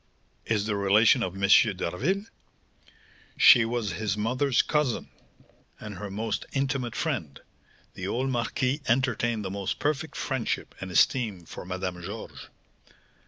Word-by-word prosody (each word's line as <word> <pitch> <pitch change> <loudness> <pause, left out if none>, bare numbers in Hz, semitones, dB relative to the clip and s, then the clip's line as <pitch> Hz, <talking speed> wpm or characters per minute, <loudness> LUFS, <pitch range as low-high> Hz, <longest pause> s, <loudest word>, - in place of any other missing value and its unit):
"Is 105 -3 0
the 105 -1 -1
relation 105 +5 +4
of 95 -4 -2
M. 100 0 0 0.3
d'Harville?" 140 - -1 1.1
"She 120 -4 +8
was 115 -3 -2
his 100 +3 -2
mother's 125 +4 +1
cousin, 150 -6 -1 0.7
and 105 -3 -8
her 105 - -5
most 110 +2 -3
intimate 135 -3 -1
friend; 115 - -3 0.5
the 95 - -5
old 130 +6 -1
marquis 125 +3 -1
entertained 120 -3 +1
the 95 - -3
most 100 -1 -3
perfect 150 +1 -2
friendship 130 -4 -2
and 95 - -5
esteem 100 -1 +2
for - - -9
Madame 90 -1 -4
Georges." 100 +5 -8
115 Hz, 130 wpm, -27 LUFS, 95-130 Hz, 1.1 s, She